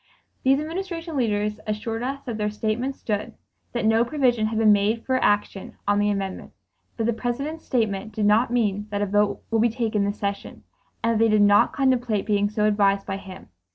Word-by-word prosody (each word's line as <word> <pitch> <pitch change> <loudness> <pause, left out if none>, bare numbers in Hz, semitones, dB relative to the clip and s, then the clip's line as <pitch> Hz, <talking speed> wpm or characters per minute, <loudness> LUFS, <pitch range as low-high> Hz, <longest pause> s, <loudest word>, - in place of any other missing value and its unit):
These 270 +1 +3
Administration 330 0 -5
leaders 210 -4 0
assured 225 +2 -3
us 275 +2 -4
that 230 -4 -5
their 210 0 0
statements 220 +5 -2
stood; 210 -2 -3 0.4
that 235 -3 -1
no 225 +1 +4
provision 245 -4 +1
had 220 0 -3
been 220 -1 +5
made 210 +3 +1
for 260 -1 +1
action 205 -1 0
on 205 0 +3
the 205 0 +2
amendment; 195 -2 -4 0.4
that 225 - -1
the 235 +1 +1
President's 275 +8 -4
statement 220 -4 -1
did 215 -1 -1
not 215 +4 +4
mean 210 -4 0
that 205 0 -1
a - - +1
vote 205 +1 +1
would 225 -1 +2
be 235 - +4
taken 220 -3 -1
this 205 +1 -2
session; 200 0 -5 0.4
and 230 - +2
that 225 - +1
they 225 - +4
did 210 -1 +4
not 205 0 +5
contemplate 245 -6 +1
being 205 -1 +1
so 210 0 0
advised 200 -2 +2
by 195 -1 -3
him. 190 - -11
215 Hz, 200 wpm, -24 LUFS, 205-245 Hz, 0.4 s, been